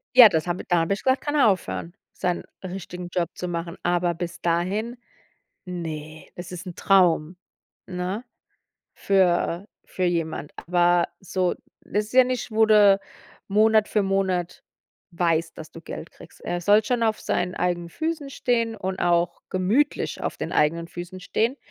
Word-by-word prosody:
Ja, 240 -4 +11
das 160 -1 -1
hab 175 +1 -1
da 175 -2 +3
hab 165 +4 0
ich 200 - -1
gesagt, 260 0 +2
kann 290 0 -2
er 280 - +5
aufhören, 180 -3 -1 0.2
seinen 180 -1 -2 0.2
richtigen 180 -1 -6
Job 175 -1 -1
zu 180 - -4
machen. 170 0 -4
Aber 175 0 +1
bis 170 0 -6
dahin, 190 +8 -1 0.7
ne, 155 -3 -6
das 175 0 -8
ist 180 +2 -7
Traum, 180 -4 +3 0.5
ne? 185 +5 -3 0.7
Für 185 0 +1 0.2
für 185 - -4
jemand. 160 -3 -2
Aber 175 0 +2
so, 185 -1 -1 0.3
das 210 +1 -2
ist 220 - -14
ja 255 0 +8
nicht, 250 -2 -3
wo 220 0 +4
du 205 -2 +6 0.5
Monat 215 +1 +4
für 210 - +1
Monat 190 -2 -1 0.5
weißt, 165 -1 0
dass 160 0 -9
du 165 - -11
Geld 165 - -8
kriegst. - - -16
Er 175 0 -2
soll 205 +4 +5
schon 245 0 0
auf 220 -1 +1
seinen 180 +1 -1
eigenen 175 -1 -1
Füßen 315 - -3
stehen 230 -3 0
und 190 -2 -4
auch 170 0 +1
gemütlich 210 +11 0
auf - - -3
den - - -4
eigenen 165 +2 +1
Füßen 175 +2 -8
stehen, 230 +8 -1
180 Hz, 160 wpm, -24 LUFS, 175-210 Hz, 0.7 s, Ja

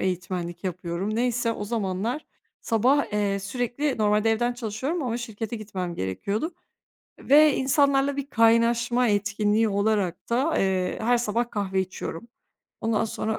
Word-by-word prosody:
eğitmenlik 175 -1 -3
yapıyorum. 180 +3 -3
Neyse, 240 -1 +1
o 210 - -5
zamanlar 220 +5 -2 0.3
sabah, 250 +3 +2
eee, 205 -1 0
sürekli 245 +7 -2
normalde 210 +1 +3
evden 240 +2 +1
çalışıyorum 245 +8 -3
ama 240 -3 -1
şirkete 225 -1 -5
gitmem 190 -5 -5
gerekiyordu 200 - -3 0.6
ve 300 +1 +5
insanlarla 275 +1 +2
bir 280 -1 -3
kaynaşma 230 +1 +3
etkinliği 210 +1 +1
olarak 200 -3 0
da, 270 +7 +1
eee, 185 -1 0
her 240 +2 +3
sabah 235 +1 -1
kahve 195 -3 -1
içiyorum. 190 +2 -6 0.5
Ondan 225 0 +1
sonra 220 0 -3
220 Hz, 130 wpm, -25 LUFS, 200-245 Hz, 0.6 s, ve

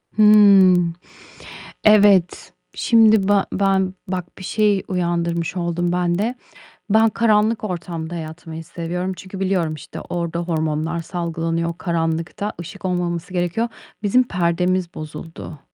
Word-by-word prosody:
Hımm, 195 -5 +6 0.9
evet, 200 -4 +4 0.2
şimdi 220 -4 +4
ba 205 -1 +3
ben 190 -1 +1
bak, 180 -1 -5
bir 190 - -10
şey 210 -1 +1
uyandırmış 170 -1 -1
oldun 175 0 -1
ben 175 -1 0
de. 235 +4 -1 0.5
Ben 220 +2 +4
karanlık 220 0 +2
ortamda 170 -3 -5
yatmayı 160 0 -7
seviyorum, 180 +3 -4
çünkü 190 0 -9
biliyorum, 185 -5 0
işte, 150 - -9
orada 170 -1 -3
hormonlar 160 -1 -2
salgılanıyor 165 -1 -3
karanlıkta, 165 +4 -2
ışık 185 +3 -10
olmaması 175 -1 -2
gerekiyor. 180 +6 0 0.4
Bizim 250 +5 +4
perdemiz 180 -2 0
bozuldu. 155 0 -8
180 Hz, 115 wpm, -20 LUFS, 170-195 Hz, 0.9 s, Hımm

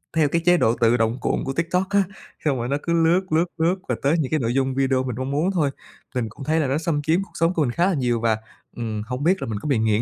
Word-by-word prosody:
theo 155 -2 +4
cái 170 +3 +1
chế 175 0 +6
độ 115 -7 +3
tự 115 +1 +3
động 115 +2 +1
cuộn - - 0
của 135 - -3
TikTok 170 +4 0
á, 200 0 +3 0.4
xong 140 -3 +2
rồi 120 0 -2
nó 140 - +1
cứ 170 - 0
lướt, 165 +2 +4
lướt, 160 +2 +3
lướt, 170 +3 +2
và - - +1
tới 145 +5 +2
những 145 -3 -1
cái 155 - +2
nội 120 -2 -1
dung 135 0 0
video 135 -1 +1
mình 125 -3 -3
mong 130 +1 -3
muốn 155 +7 +1
thôi. 160 -7 +1 0.5
Tình 120 -3 -1
cũng 125 - -10
thấy 160 +3 +2
là 145 - +1
nó 135 - +1
xâm 155 -2 -1
chiếm 160 +6 +1
cuộc - - -15
sống 165 +2 +1
của 165 - 0
mình 125 - 0
khá 170 +8 +1
là 195 - +2
nhiều 125 -5 0
và, 110 -2 +2 0.4
ừm, 110 -3 -3
hông 125 +3 -4
biết 185 +3 +2
là - - -3
mình 110 -2 -3
có 150 - -6
bị 135 - +2
nghiện 110 -1 +2
140 Hz, 305 wpm, -23 LUFS, 120-165 Hz, 0.5 s, chế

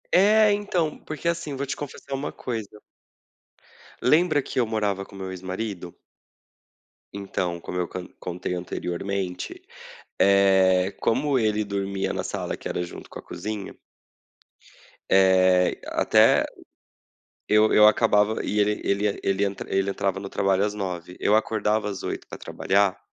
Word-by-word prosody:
É, 210 +3 +6
então, 180 -6 -1
porque 155 +2 -6
assim, 165 -4 -2
vou 140 +1 -3
te 140 - -3
confessar 140 -1 -8
uma 135 +1 -3
coisa 115 -5 -5 1.4
Lembra 155 +2 +4
que 130 - -3
eu 120 - +2
morava 105 -3 -1
com 100 - -15
meu 95 -1 -6
ex-marido? 95 0 -5 1.2
Então, 95 -3 -3
como 90 - -6
eu 90 -1 -1
con 90 0 -7
contei 90 0 -4
anteriormente, 90 +1 -4 0.6
eh, 95 -1 +4
como 140 +4 +1
ele 110 -1 +1
dormia 100 -1 -2
na - - -3
sala - - -4
que - - -7
era 90 - -2
junto 85 - -11
com - - -9
a - - -9
cozinha 105 -2 -6 1.3
Eh, 95 -1 +4
até, - - +4 1.0
eu 105 0 +4
eu 105 - +7
acabava 110 -1 +2
e 105 - -1
ele 105 0 +1
ele 100 +1 0
ele 100 +1 +1
entra 100 -1 -4
ele 95 0 +1
entrava 95 -1 -1
no 100 - -6
trabalho 95 0 +1
às 105 - -1
9, 90 -3 -5
eu 105 - +3
acordava 110 -1 0
às 100 - -6
8 - - -5
para - - -9
trabalhar, 100 0 0
100 Hz, 145 wpm, -25 LUFS, 95-110 Hz, 1.4 s, eu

